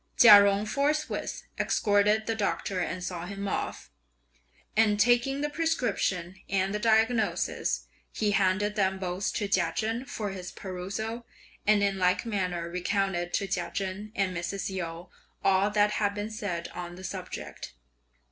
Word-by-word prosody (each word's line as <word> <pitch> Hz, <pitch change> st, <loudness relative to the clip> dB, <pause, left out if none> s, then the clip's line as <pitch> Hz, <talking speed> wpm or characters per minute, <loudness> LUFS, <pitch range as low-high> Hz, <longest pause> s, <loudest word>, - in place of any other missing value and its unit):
Chia 205 Hz, -4 st, +10 dB
Jung 200 Hz, +1 st, +2 dB
forthwith 290 Hz, +7 st, -1 dB, 0.2 s
escorted 210 Hz, +1 st, +2 dB
the 225 Hz, -, 0 dB
Doctor 200 Hz, -3 st, -1 dB
and 180 Hz, 0 st, -3 dB
saw 175 Hz, -1 st, -4 dB
him 200 Hz, +1 st, -5 dB
off, -, -, -3 dB, 0.8 s
and 215 Hz, -1 st, +3 dB
taking 240 Hz, +5 st, +3 dB
the 295 Hz, -, 0 dB
prescription 245 Hz, -, -1 dB
and 195 Hz, 0 st, +1 dB
the 210 Hz, -, -1 dB
diagnosis, 225 Hz, 0 st, +1 dB, 0.3 s
he 210 Hz, -2 st, 0 dB
handed 200 Hz, +1 st, +2 dB
them 190 Hz, -2 st, +1 dB
both 185 Hz, +1 st, -2 dB
to 205 Hz, -, -1 dB
Chia 185 Hz, -4 st, +2 dB
Chen 225 Hz, +3 st, -1 dB
for 215 Hz, -7 st, -4 dB
his 185 Hz, -2 st, -7 dB
perusal, 200 Hz, +5 st, -5 dB, 0.4 s
and 210 Hz, -1 st, +5 dB
in 195 Hz, -1 st, +1 dB
like 180 Hz, +5 st, +2 dB
manner 180 Hz, -6 st, -2 dB
recounted 180 Hz, 0 st, -1 dB
to 200 Hz, -, 0 dB
Chia 180 Hz, -2 st, -2 dB
Chen 195 Hz, +2 st, -3 dB
and 195 Hz, -3 st, 0 dB
Mrs. 185 Hz, +3 st, -3 dB
Yu 170 Hz, -1 st, -5 dB, 0.4 s
all 195 Hz, +1 st, +4 dB
that 205 Hz, 0 st, +3 dB
had 205 Hz, -1 st, 0 dB
been 210 Hz, +1 st, -4 dB
said 200 Hz, -6 st, -3 dB
on 175 Hz, 0 st, -7 dB
the 185 Hz, -, -11 dB
subject. 185 Hz, -1 st, -7 dB
200 Hz, 150 wpm, -28 LUFS, 185-215 Hz, 0.8 s, Chia